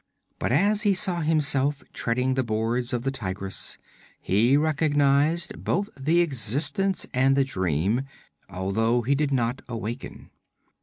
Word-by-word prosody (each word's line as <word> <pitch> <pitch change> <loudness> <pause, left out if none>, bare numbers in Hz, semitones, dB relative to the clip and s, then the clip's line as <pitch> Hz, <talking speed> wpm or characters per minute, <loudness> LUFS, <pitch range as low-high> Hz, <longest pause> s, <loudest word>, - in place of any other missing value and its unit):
But - - -1
as 200 +9 +3
he 205 -3 +3
saw 180 -2 0
himself 145 -3 +1
treading 125 +2 0
the 130 - +1
boards 115 +2 -1
of 120 -2 -2
the 135 - 0
Tigress, 95 -6 -4 0.4
he 115 +8 +3
recognized 150 +1 +1
both 200 +4 -1
the 155 +6 +2
existence 155 - 0
and 135 +1 +3
the 140 - +3
dream, 95 - -1 0.4
although 110 +6 0
he 135 +5 +1
did 145 0 0
not 125 -1 0
awaken. 115 +2 -6
135 Hz, 135 wpm, -25 LUFS, 115-150 Hz, 0.4 s, as